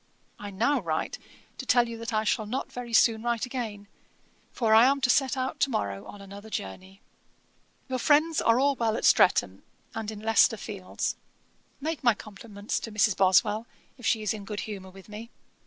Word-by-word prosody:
I 205 - -7
now 230 +9 +1
write - - -3 0.4
to 260 - -5
tell 240 -1 +4
you 230 - -6
that 230 +1 -5
I 215 -1 +1
shall 215 0 0
not 255 +5 -4
very 245 -1 -7
soon 225 -1 +4
write 235 0 -1
again, 225 -5 -5 0.6
for 225 -3 +1
I 225 +2 +8
am 275 +2 +3
to 250 -1 +4
set 270 0 +1
out 260 +3 -3
to 280 - +2
morrow 100 - -3
on 205 - -11
another 200 +2 -11
journey. 190 - -7 0.9
'Your 260 -1 -2
friends 310 +3 +3
are 230 +2 +3
all 280 +1 +2
well 225 -3 0
at - - -2
Streatham, 100 - +4 0.3
and 220 -1 -4
in 215 -1 -7
Leicester 225 +1 +3
fields. 195 -3 -4 0.6
Make 310 +1 -4
my 240 -3 +4
compliments 205 0 -6
to 225 - -7
Mrs. 210 -1 +2
Boswell, 195 +4 +3 0.3
if 245 - -17
she 220 -2 +1
is 215 - 0
in 210 -2 -7
good 205 +1 -5
humour 195 -3 -7
with 190 0 -15
me. 215 +2 -9
220 Hz, 190 wpm, -27 LUFS, 205-245 Hz, 0.9 s, I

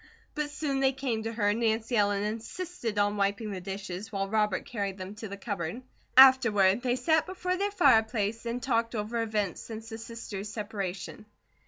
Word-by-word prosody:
But 300 -1 -2
soon 290 -2 -2
they 270 0 +3
came 255 -4 -2
to 225 +1 -3
her 205 -3 +1
and 210 +3 0
Nancy 225 +1 0
Ellen 205 -1 +2
insisted 230 - -4
on 205 0 +2
wiping 200 +2 0
the 190 -2 -5
dishes, 195 +2 -6
while 195 -1 -1
Robert 210 -2 0
carried 200 -4 -3
them 185 +1 -7
to 220 +1 -7
the 200 0 -7
cupboard. 200 +2 -4 0.3
Afterward, 235 -6 +7
they 245 -1 +1
sat 315 +3 +2
before 365 -1 -2
their 400 +2 0
fireplace 225 - +2
and 240 +1 -3
talked 230 -2 0
over 220 +2 -2
events 210 -5 -1
since 225 0 -8
the 225 -1 -7
sisters' 225 -3 -6
separation. 205 -1 -5
220 Hz, 180 wpm, -29 LUFS, 205-245 Hz, 0.3 s, Afterward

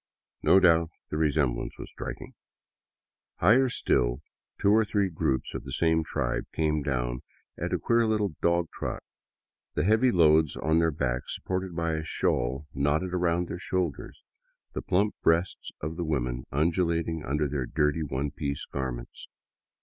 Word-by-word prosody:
No 95 - +6
doubt 85 -3 +4 0.2
the 75 - -1
resemblance 75 -6 0
was - - -9
striking. - - -7 1.0
Higher 120 +8 +4
still, - - +1 0.4
two 100 - +4
or 110 +1 +5
three 100 -3 0
groups 65 -5 -1
of - - -5
the - - -8
same 80 -1 +2
tribe - - -2
came 75 -1 +1
down 60 -3 -2 0.3
at - - -4
a - - +2
queer 115 -1 +2
little 105 -5 0
dog 85 -1 +2
trot, - - -4 0.7
the - - +1
heavy 110 +6 +4
loads 80 - +4
on 80 +3 +2
their 80 0 +3
backs 65 -4 -2
supported 95 -1 -3
by 85 -1 0
a 80 0 -2
shawl 65 -2 -1
knotted 75 +6 0
across 90 -1 +1
their 90 - -5
shoulders, 90 -6 -3 0.5
the - - -3
plump 100 +4 +1
breasts 85 +3 +1
of 80 +2 -4
the 85 - -1
women 60 -6 -2
undulating 85 +1 0
under 75 +2 0
their 70 -3 -2
dirty, 75 +1 +1
one 70 -1 -2
piece 70 -1 -4
garments. 60 -3 -6
80 Hz, 155 wpm, -28 LUFS, 70-90 Hz, 1.0 s, No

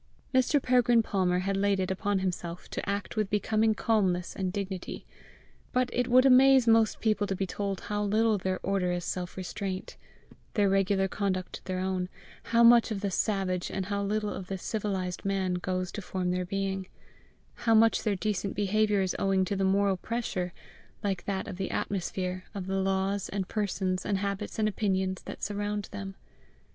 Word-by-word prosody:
Mr. 260 +3 +4
Peregrine 245 -3 +4
Palmer 185 -4 +1
had 195 0 0
laid 200 0 +2
it 185 0 -1
upon 200 +1 0
himself 180 -2 -3
to - - -4
act 200 -1 -3
with 215 -3 0
becoming 215 +2 +2
calmness 195 -6 +1
and 185 -2 -2
dignity. 195 -2 -5 0.7
But 250 0 +1
it 245 0 +1
would 255 +1 +6
amaze 265 -1 +7
most 225 -1 +4
people 215 -2 +1
to 195 - -1
be 195 - -1
told 195 0 -3
how 210 0 -2
little 215 +1 +2
their 185 0 -1
order 190 -2 +1
is 175 -1 -2
self 180 0 -4
restraint, 190 0 -5 0.6
their 205 -3 +4
regular 195 0 +2
conduct 190 -2 -3
their 185 -1 -2
own 185 -1 -1 0.4
how 235 0 +4
much 235 0 +7
of 210 -3 -3
the 200 -1 -1
savage 185 -2 0
and 190 - -3
how 200 +1 -2
little 210 +1 -1
of 185 - -7
the 195 - -3
civilized 190 -3 -3
man 195 -2 0
goes 185 0 -2
to 210 - -5
form 180 -1 -2
their 180 0 -1
being 195 0 -2 0.7
how 230 -1 +2
much 225 +1 +5
their 210 -3 0
decent 200 0 -2
behaviour 205 +1 +2
is 190 -1 -1
owing 190 -1 +2
to 200 - -2
the 195 - 0
moral 195 0 +2
pressure, 190 -4 -3 0.5
like 195 -3 -2
that 195 -1 -2
of 180 - -6
the 190 -1 -2
atmosphere, 185 -1 -2
of 195 -2 -4
the 195 +1 -1
laws 195 +1 0
and 195 -2 -3
persons 190 -3 -1
and 200 -1 0
habits 200 +1 -3
and 215 -1 +2
opinions 190 -2 0
that - - -8
surround 205 0 -2
them. 195 -1 -6
195 Hz, 180 wpm, -29 LUFS, 185-210 Hz, 0.7 s, amaze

